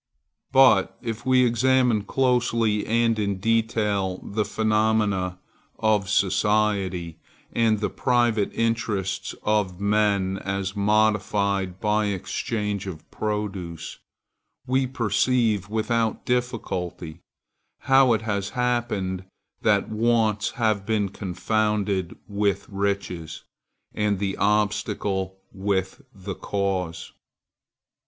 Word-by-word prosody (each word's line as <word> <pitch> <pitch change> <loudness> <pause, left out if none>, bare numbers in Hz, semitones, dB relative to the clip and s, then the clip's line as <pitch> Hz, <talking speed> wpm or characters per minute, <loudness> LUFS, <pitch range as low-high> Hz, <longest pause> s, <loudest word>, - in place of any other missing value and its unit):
But 135 0 +5
if 115 +1 -5
we 130 -1 +5
examine 120 -2 +2
closely 120 -4 +1
and 115 -1 +2
in 100 -2 -1
detail 105 -3 0
the 105 +1 -1
phenomena 105 -4 +1 0.4
of 105 -3 +1
society, 100 -4 +1 0.3
and 110 -2 +2
the 105 - -1
private 120 -4 +1
interests 110 -4 -1
of 105 -4 0
men 100 -2 +1
as 100 0 -3
modified 100 -2 +1
by 105 +1 +1
exchange 100 +1 -3
of 80 -5 -8
produce, 100 -6 -4 0.7
we 130 0 +1
perceive, 115 -4 +1
without 110 +1 -1
difficulty, 90 -9 -3 0.6
how 135 -2 +5
it 110 -1 -1
has 100 -2 -2
happened 115 -7 -1 0.4
that - - +2
wants 110 -2 +1
have 110 -4 +1
been 105 -2 0
confounded 100 0 -1
with 100 -1 0
riches, 100 -5 -3 0.5
and 105 -1 0
the 95 0 -2
obstacle 100 -2 0 0.2
with 95 -1 -2
the 95 0 -7
cause. 95 -5 -3
105 Hz, 95 wpm, -24 LUFS, 95-115 Hz, 0.7 s, But